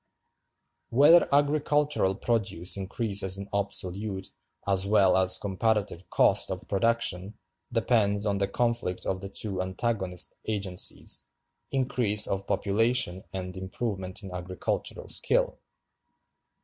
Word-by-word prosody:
Whether 145 +8 +6
agricultural 145 -6 +2
produce 100 -6 0
increases 100 -1 0
in 100 0 -7
absolute 100 0 -2 0.3
as 95 -1 +2
well 100 -3 +4
as 95 0 +5
comparative 100 -2 -2
cost - - +3
of - - -6
production 105 -2 0 0.3
depends 110 -3 +1
on 100 -1 0
the 100 - +1
conflict 115 -4 -2
of 95 -1 -2
the 100 - -7
two 100 -2 -3
antagonist 95 -1 -1
agencies—increase 105 +3 0
of 100 0 -3
population 100 -1 +1
and 90 -1 -5
improvement 95 0 -4
in 95 - -8
agricultural 90 0 -4
skill. - - +1
100 Hz, 105 wpm, -27 LUFS, 95-115 Hz, 0.3 s, Whether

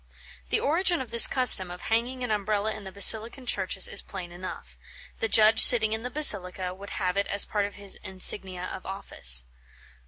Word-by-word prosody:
The - - -1
origin 345 +3 -2
of 255 - -10
this 235 -1 +8
custom 250 -8 +2
of 180 0 -11
hanging 245 +3 -4
an 245 - -6
Umbrella 210 +1 -4
in 210 -2 -12
the 190 - -10
Basilican 220 +6 +3
churches 190 -4 -2
is - - -1
plain 185 -3 -11
enough. 180 +2 -12 0.4
The 225 - -3
judge 220 0 +2
sitting 220 -3 +6
in 220 - -5
the 250 - -7
basilica 190 -10 +2
would 200 +2 -14
have 185 -1 -4
it 200 - -3
as 200 - 0
part 205 -1 -4
of 205 - -15
his 200 -1 -5
insignia 185 -1 -4
of 185 - -10
office. 60 - 0
205 Hz, 190 wpm, -23 LUFS, 185-225 Hz, 0.4 s, this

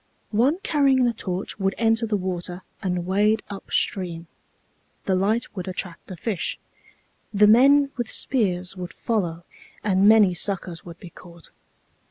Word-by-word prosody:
One 250 +9 +2
carrying 275 -4 +3
the 240 - +1
torch 190 -1 -5
would 195 0 0
enter 225 0 +1
the 210 -1 0
water 180 -1 -4 0.2
and 180 -2 -2
wade 210 +4 +2
up 200 - -9
stream. 175 -4 -1 0.8
The 190 - +1
light 210 +5 0
would 185 -2 -5
attract 180 -2 -6
the 185 - -8
fish. 200 -2 -3 0.7
The 210 0 +4
men 275 +6 +5
with 240 -2 -3
spears 185 -7 0
would 180 -1 -7
follow, 175 -7 -2 0.4
and 195 0 +4
many 215 -4 +6
suckers 180 -1 -1
would 170 -1 -11
be 175 - -11
caught. 170 -2 -15
195 Hz, 150 wpm, -23 LUFS, 180-225 Hz, 0.8 s, many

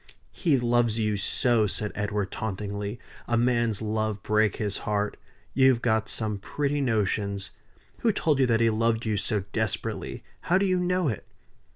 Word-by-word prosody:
"He 155 -7 +2
loves 120 -2 +2
you 105 -2 +1
so!" 110 +2 +2
said 105 +1 -3
Edward, 105 -1 -2
tauntingly. 100 +1 -4 0.3
"A 120 - +1
man's 120 -3 +1
love 110 -2 -1
break 105 -1 +2
his 105 -2 -2
heart! 105 0 -1 0.4
You've 130 -3 +4
got 110 -2 +1
some 105 -2 -2
pretty 145 +6 -1
notions! 100 -5 -1 0.5
Who 230 - +3
told 155 -8 +1
you 130 - +4
that 115 -1 +2
he 115 -1 +4
loved 115 +1 +1
you 110 -1 0
so 100 0 0
desperately? 110 -3 -2 0.2
How 180 - +2
do 195 - +2
you 185 -1 +2
know 180 -1 +1
it?" 110 -7 -3
110 Hz, 165 wpm, -27 LUFS, 105-120 Hz, 0.5 s, You've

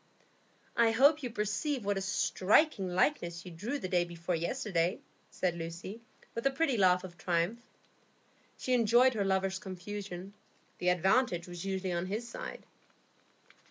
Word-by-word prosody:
"I 235 -1 +5
hope 285 +7 +5
you 250 - -3
perceive 225 +4 -2
what 205 0 +1
a 195 - -2
striking 205 - +2
likeness 175 - +1
you 180 - -8
drew 210 - -3
the 215 - -4
day 180 -1 +2
before 170 +1 -4
yesterday," 175 -1 0 0.3
said 180 -2 -1
Lucy, 170 +6 -6 0.3
with 230 - -4
a - - +4
pretty 275 -1 +1
laugh 180 -3 +4
of 175 -2 -10
triumph. 175 +7 0 1.0
She 255 - -1
enjoyed 240 +2 +5
her 210 -3 0
lover's 190 0 0
confusion; 190 0 -7 0.5
the 180 - +2
advantage 180 0 +2
was 175 0 -7
usually 190 -1 -2
on 175 +1 -1
his 215 +5 -3
side. - - -7
195 Hz, 150 wpm, -32 LUFS, 180-235 Hz, 1.0 s, I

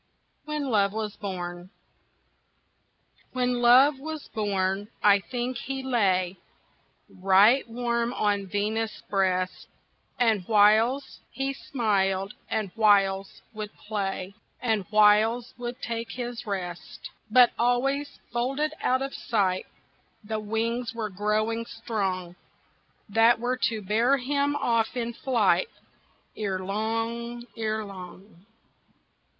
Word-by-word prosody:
When 300 -3 -3
Love 200 -2 +3
Was 215 -1 -3
Born 175 -3 -6 1.6
When 250 -1 0
Love 260 +4 +6
was 315 +1 -7
born 200 -2 -1 0.2
I 205 -1 +6
think 245 +4 -4
he 270 0 -5
lay 190 -7 +1 0.7
Right 200 +7 +4
warm 235 0 -1
on 205 -2 0
Venus' 215 +3 -2
breast, 185 -2 0 0.5
And 225 -5 +3
whiles 220 +5 +3
he 270 0 -2
smiled 195 -7 0 0.2
and 215 -4 -2
whiles 195 -3 +2
would 215 -1 -6
play 195 -2 -4 0.3
And 220 -5 0
whiles 215 +3 +4
would 240 0 -5
take 230 0 -4
his 245 -2 -5
rest. 180 -4 -6 0.2
But 245 +2 +6
always, 275 +4 +1 0.2
folded 275 +6 0
out 260 +1 +1
of 275 - -5
sight, 190 -5 0 0.6
The 215 +1 -3
wings 225 +2 -2
were 215 -3 -3
growing 215 +4 -1
strong 185 -5 -3 0.7
That 225 +3 +4
were 250 +2 -1
to 220 -2 -5
bear 230 +8 +3
him 280 +2 0
off 230 -2 0
in 235 -1 -2
flight 215 -8 +2 0.7
Erelong, 225 +4 -3
erelong. 200 -3 -6
220 Hz, 105 wpm, -26 LUFS, 200-245 Hz, 1.6 s, Love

